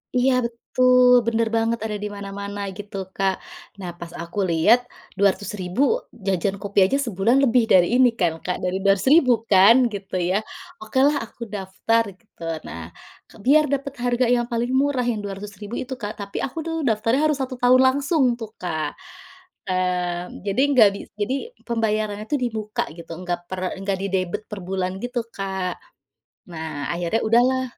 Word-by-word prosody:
Iya 255 +1 +3
betul 250 +2 +3 0.2
bener 230 0 +1
banget 225 +1 +1
ada 210 -1 -3
di - - -1
mana-mana 200 0 -6 0.2
gitu 205 -1 -7 0.2
Kak 195 -1 +1 0.4
nah 185 -2 -5
pas 170 -1 -8
aku 170 +4 -5
lihat, 170 +9 +5 0.4
Rp200.000 200 +1 0 0.4
jajan 195 0 0
kopi 200 0 0
aja 235 - 0
sebulan 225 +3 +2
lebih 250 -2 +4
dari 180 -2 +6
ini 255 -1 +7
kan 175 -3 +2
Kak, 180 - -1
dari 185 +1 0
Rp200.000 245 - +4 0.2
kan 195 +4 +8 0.2
gitu 195 -2 -6
ya 190 - +2 0.4
okelah 265 +7 +2
aku 235 - -23
daftar 205 +4 0 0.2
gitu. 215 -6 -16 0.2
Nah, 85 - -7 0.6
biar 305 +4 +6
dapet 280 0 -2
harga 245 +1 +2
yang 240 -1 0
paling 235 +1 -1
murah 280 -2 +1
yang 220 - -3
Rp200.000 205 +2 -7
itu 260 +1 -6
Kak 210 0 -4
tapi 200 - -7
aku 270 - -9
tuh 325 - -2
daftarnya 225 +4 +1
harus 300 -2 0
1 255 0 -5
tahun 255 +1 +6 0.2
langsung 290 +1 +1 0.2
tuh 225 -2 -6
Kak, 160 -4 -2 0.8
mmm, 180 -1 -1
jadi 200 +6 +1 0.2
gabi 200 -4 +6 0.2
jadi 220 +6 0 0.3
pembayarannya 215 -3 -1
itu 295 - +1
di - - +2
muka 215 0 -2
gitu 170 0 -10
nggak 175 -1 -2
per 185 - -3 0.2
nggak 195 -1 -1
didebet 190 -2 -1
perbulan 190 -2 -3
gitu 245 0 -2 0.2
Kak, 190 -2 -3 0.8
nah 160 -3 -5
akhirnya 175 +6 -1
udahlah 255 +3 +4
205 Hz, 155 wpm, -23 LUFS, 190-245 Hz, 0.8 s, kan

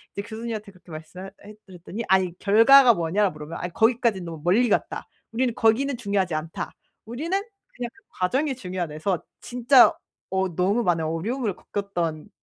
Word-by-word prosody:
이제 200 - -2
교수님한테 220 0 -6
그렇게 185 -1 -21
말씀을 160 +4 -9
하 - - -9 0.2
해 - - -10
해 210 - -12
드렸더니 190 +4 -7
"아니 185 -2 +2
결과가 235 +5 +7
뭐냐."라고 185 +2 0
물으면 150 +2 -8
"아 180 - -2
거기까지는 225 -1 +1
너무 165 -3 -7
멀리 225 +8 +3
갔다. - - -1 0.3
우리는 245 0 0
거기는 245 +4 +2
중요하지 200 -6 -1
않다. 160 +1 -5 0.3
우리는 270 +10 -5 0.4
그냥 245 -1 -4
그 395 - -24 0.2
과정이 265 +10 0
중요하다." 180 -8 -5
해서 175 +3 -1 0.2
진짜 245 +4 +5 0.4
어 190 -3 -1
너무 200 +6 +1
많은 170 -4 +1
어려움을 200 +7 -2
겪었던 175 -6 -4
200 Hz, 410 characters per minute, -24 LUFS, 175-235 Hz, 0.4 s, 결과가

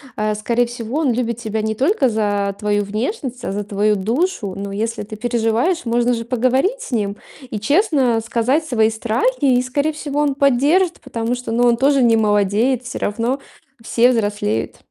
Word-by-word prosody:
э, 215 0 0
скорее 235 +3 +1
всего, 240 +3 -4
он 295 -5 +2
любит 235 -1 -1
тебя 220 -2 -3
не 220 0 -2
только 275 - +2
за 205 -3 0
твою 205 0 0
внешность, 245 - -4
а - - -3
за 205 0 -3
твою 205 +1 +1
душу. 225 - -1
Но 200 0 -5
если 215 +1 -3
ты 215 +1 -9
переживаешь, 240 +9 0
можно 240 +1 +1
же 230 -1 -3
поговорить 260 - +1
с - - -8
ним 205 -4 -1 0.3
и 210 - -3
честно 275 - +2
сказать 240 +7 0
свои 220 -6 +2
страхи. 250 - +1
И, - - +2
скорее 280 +5 -1
всего, 295 -1 -3
он 285 -2 +1
поддержит, 285 +7 +2
потому 240 -2 -3
что, 245 -2 -6
ну 240 +2 +2
он 240 - +4
тоже 275 +1 +3
не 230 -2 +4
молодеет. 215 +4 +2
Всё 245 - -6
равно 230 +6 -1 0.4
все 240 +2 +3
взрослеют. 205 - -1
235 Hz, 180 wpm, -19 LUFS, 215-270 Hz, 0.4 s, он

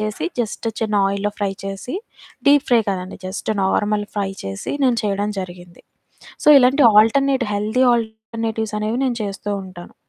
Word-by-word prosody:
చేసి, 215 -7 -3
జస్ట్ 225 0 -3
చిన్న 215 -1 -1
ఆయిల్‌లో 200 +1 -1
ఫ్రై 200 -1 -1
చేసి 195 - -5 0.5
డీప్ 285 0 +5
ఫ్రై 235 -2 +6
కాదండి. 185 -1 -3
జస్ట్ 190 +2 -6
నార్మల్ 205 +2 +1
ఫ్రై 195 -1 -1
చేసి, 95 0 -5
నేను 245 -3 +3
చెయడం 205 0 -1
జరిగింది. 175 -1 -10 0.6
సో, - - -7
ఇలాంటి 260 +2 +4
ఆల్టర్‌నేట్, 265 +4 +4
హెల్దీ 215 +5 +1
ఆల్టర్‌నేటివ్స్ 220 -1 -3
అనేవి 220 +3 -1
నేను 245 -3 0
చేస్తూ 200 +1 -6
ఉంటాను. 185 -2 -11
210 Hz, 150 wpm, -20 LUFS, 195-230 Hz, 0.6 s, ఫ్రై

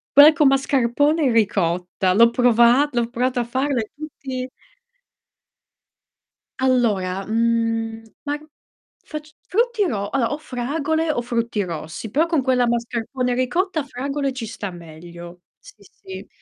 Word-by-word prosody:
quella 295 +2 +9
con 300 -4 +4
mascarpone 275 +3 +2
e 250 - +3
ricotta, 185 -3 +1
l'ho 230 +3 +6
prova 245 +3 +4
l'ho 240 -1 -1
provata 250 +1 -1
a - - -1
farla 260 +2 -1
e 215 - -7
tutti 265 -4 -6 2.1
Allora, 205 -8 +1
mhmm, 225 0 0 0.2
ma 290 +1 -1 0.7
facc 305 0 -8
frutti 460 0 +1
ro 200 -3 -3
allora 260 -3 0
o - - -3
fragole 305 +4 -2
o 240 - -1
frutti 235 -3 -1
rossi, 170 +4 -6
però 320 +4 +2
con 320 -6 +1
quella 250 -2 +2
mascarpone 240 +2 -2
e - - 0
ricotta 315 +6 0
fragole 275 +1 -3
ci 245 -3 -5
sta 210 -2 -6
meglio. 170 +1 -11 0.2
Sì, - - -15 0.2
sì. 385 -1 -10
245 Hz, 135 wpm, -21 LUFS, 225-285 Hz, 2.1 s, quella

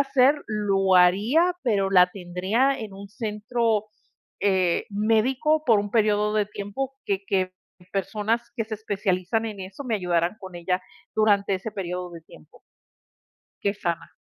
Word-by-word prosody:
hacer, 275 0 +4
lo 195 -3 +1
haría, 215 - +4
pero, 200 -6 +1
la 180 -2 +7
tendría 195 +9 0
en 215 -4 -7
un 200 +1 -10
centro, 215 0 -1 0.5
eh, 190 -3 +2
médico 250 +9 +2
por 225 -4 +5
un 205 0 -5
periodo 210 -1 +2
de 210 -1 +2
tiempo, 210 +7 -5
que 200 -1 -1
que 185 -1 0 0.4
personas 210 +4 -1
que 225 - -1
se 215 0 -5
especializan 205 0 -1
en 210 -3 -6
eso, 190 +8 -8
me 235 -3 -1
ayudaran 175 0 0
con 190 -2 -10
ella 180 +2 -1 0.3
durante 205 -2 +3
ese 190 +4 -4
periodo 180 -2 -4
de 170 -1 -10
tiempo. 80 - -18 1.0
Que 200 0 +1
sana. 170 -4 -4
205 Hz, 145 wpm, -25 LUFS, 190-225 Hz, 1.0 s, la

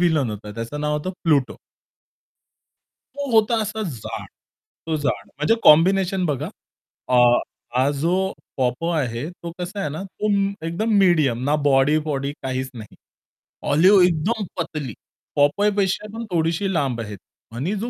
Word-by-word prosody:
Villain 160 -8 +2
होता, 105 0 -7
त्याचं 115 +6 -5
नाव 150 0 0
होतं 150 +5 -3
प्लुटो. 145 -6 +2 1.6
तो 285 -1 -4
होता 225 +1 +4
असा 220 +1 -3
जाड. 140 - -6 0.6
तो 160 -1 0
जाड 105 -9 -2
म्हणजे 150 +10 +1
कॉम्बिनेशन 185 +4 +5
बघा. 145 -5 -2 0.6
अ, 125 - +3 0.6
हा 130 +2 +3
जो 170 +3 +2 0.4
पॉपय 130 +6 0
आहे, 125 +2 -3
तो 170 -1 -9
कसा 180 +3 -5
आहे 195 - -1
ना 155 +5 -5
म - - -6 0.5
तो 195 -5 -10
एकदम 180 +7 -1
मीडियम. 155 -10 +3
ना 145 +2 +3
बॉडी-वॉडी 140 0 +2
काहीच 130 0 -3
नाही. 110 -4 -10 0.7
ऑलिव्ह 185 +6 +6
एकदम 180 +6 0
पतली 145 -7 -4 0.4
पॉपयपेक्षा 195 +7 +2
पण 230 - -5
थोडीशी 170 +4 0
लांब 135 -8 0
आहे. 105 -2 -6 0.4
आणि 150 - -2
जो 240 - -2
155 Hz, 140 wpm, -22 LUFS, 135-190 Hz, 1.6 s, ऑलिव्ह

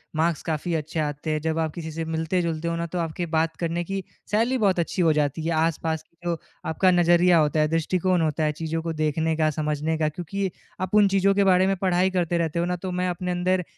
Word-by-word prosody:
Marks 160 0 +1
काफ़ी 160 +2 -1
अच्छे 155 +2 -5
आते 150 +1 -2
हैं। 155 -1 -1
जब 160 0 -1
आप 160 -2 -1
किसी 160 -2 -6
से 165 +1 -4
मिलते-जुलते 165 0 -1
हो 170 - -1
ना 170 0 -2
तो 175 - 0
आपके 165 +1 -2
बात 160 +1 +1
करने 170 +1 -1
की 195 +2 -4 0.3
शैली 230 +5 +2
बहुत 190 -3 +3
अच्छी 170 +2 -1
हो 165 -2 +4
जाती 150 +2 -1
है। 170 - 0
आस-पास 160 -1 -2
की 170 - -40
जो 170 -1 0 0.3
आपका 185 +3 +3
नज़रिया 175 0 +5
होता 155 0 +2
है, 155 - +3
दृष्टिकोण 180 +2 +1
होता 155 -1 0
है। 150 - +2
चीज़ों 165 0 -2
को 165 - -1
देखने 160 +1 0
का, 155 - +4
समझने 155 +1 -1
का 155 -1 +1
क्योंकि 195 +3 -2 0.3
आप 185 +2 -1
उन 200 - +5
चीज़ों 195 +1 +4
के 200 - +4
बारे 185 +1 +4
में 195 - +2
पढ़ाई 185 +1 +3
करते 175 0 +1
रहते 160 +1 -3
हो 170 - +1
ना? - - 0
तो - - -2
मैं 185 - +1
अपने 180 +1 -3
अंदर 180 +1 +1
165 Hz, 240 wpm, -25 LUFS, 160-180 Hz, 0.3 s, नज़रिया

